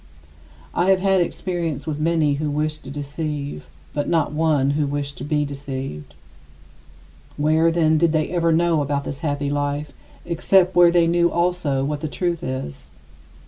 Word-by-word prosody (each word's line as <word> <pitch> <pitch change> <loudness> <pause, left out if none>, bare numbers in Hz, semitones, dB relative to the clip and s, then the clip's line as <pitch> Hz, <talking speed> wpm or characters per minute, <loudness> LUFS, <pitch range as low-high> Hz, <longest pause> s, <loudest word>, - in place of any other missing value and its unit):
I 180 - +1
have 190 -1 +5
had 195 -1 +3
experience 170 -5 -3
with 150 -2 -3
many 155 -2 +2
who 155 - -1
wished 150 +1 -2
to - - -7
deceive, 145 - -5 0.3
but 145 - -2
not 160 -3 +1
one 150 -3 +2
who 145 0 0
wished 140 0 -3
to - - -6
be 150 0 0
deceived. 135 - -6 1.2
Where, 155 +3 +3
then, 160 -2 +3
did 170 -1 +3
they 155 0 0
ever 170 -2 +2
know 165 -1 +2
about 140 0 -1
this 140 0 -6
happy 145 -3 -2
life, 145 0 -2 0.3
except 180 +2 +2
where 175 -1 +7
they 170 -1 +4
knew 170 +1 +3
also 170 -6 0
what 150 0 -3
the 155 - -2
truth 170 +2 -2
is? 130 - -5
150 Hz, 165 wpm, -22 LUFS, 145-170 Hz, 1.2 s, where